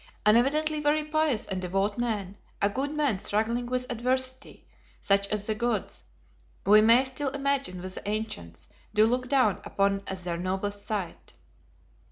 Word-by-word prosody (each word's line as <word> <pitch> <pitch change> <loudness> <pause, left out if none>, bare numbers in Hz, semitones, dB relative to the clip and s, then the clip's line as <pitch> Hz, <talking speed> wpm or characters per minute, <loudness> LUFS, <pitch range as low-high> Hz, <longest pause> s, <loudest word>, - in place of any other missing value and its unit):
An 210 +1 +6
evidently 305 +5 +3
very 300 +1 +2
pious 305 -6 +1
and 190 -2 -4
devout 195 +4 -1
man; 210 -5 -2 0.2
a 200 - +2
good 270 +6 -2
man 290 -10 0
struggling 230 +5 -1
with 250 0 -1
adversity, 255 +2 -2 0.3
such 200 0 +2
as 210 0 -2
the 220 - 0
gods, 235 0 -2 0.6
we 210 +2 +7
may 230 +4 +6
still 270 +2 -2
imagine 275 -8 -1
with 185 0 -5
the 205 - -5
ancients, 205 - -5 0.3
do 215 +1 +6
look 250 +2 0
down 255 -9 +2
upon 195 0 0
as 190 -1 -5
their 175 -1 -3
noblest 195 +3 -3
sight. 205 -5 -5
220 Hz, 160 wpm, -27 LUFS, 200-260 Hz, 0.6 s, we